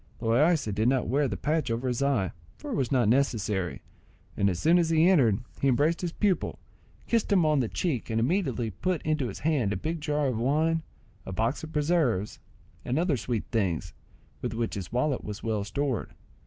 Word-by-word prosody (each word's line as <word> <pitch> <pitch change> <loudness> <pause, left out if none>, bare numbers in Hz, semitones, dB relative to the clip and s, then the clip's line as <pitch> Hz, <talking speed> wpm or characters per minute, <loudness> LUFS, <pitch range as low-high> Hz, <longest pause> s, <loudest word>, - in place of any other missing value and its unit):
Loaysa 125 - +2
did 110 +3 +1
not 130 -1 +2
wear 140 +4 +2
the 100 -6 -3
patch 150 - 0
over 115 +3 -1
his 125 +1 -1
eye, 130 -10 +1 0.3
for 295 - -7
it - - -1
was 130 - -1
not 125 -5 +3
necessary, 105 -7 0 0.5
and 100 - +2
as 90 - -2
soon 165 - +4
as 165 -2 +1
he 165 +1 +4
entered 125 - +4 0.2
he 140 - +3
embraced 145 +6 +2
his 175 -2 -2
pupil, 195 0 0 0.5
kissed 230 -2 0
him 185 -5 +4
on 150 -2 +3
the 125 - +1
cheek, 150 -11 -2
and 115 0 0
immediately 130 - 0
put 180 - -2
into 155 -4 0
his 100 - -7
hand 140 -9 +1
a - - -1
big 160 - -3
jar 150 -1 0
of 125 -5 0
wine, 155 +6 +2 0.4
a - - -7
box 115 +10 -1
of 160 - -7
preserves, 150 - +1 0.4
and 125 - -1
other 165 -2 +2
sweet 120 -2 -2
things, 95 -9 -1 0.5
with 120 -3 -3
which 115 0 -2
his 95 -4 -5
wallet 130 +3 0
was 105 0 -7
well 110 -3 -1
stored. 130 +4 -2
130 Hz, 200 wpm, -28 LUFS, 115-155 Hz, 0.5 s, soon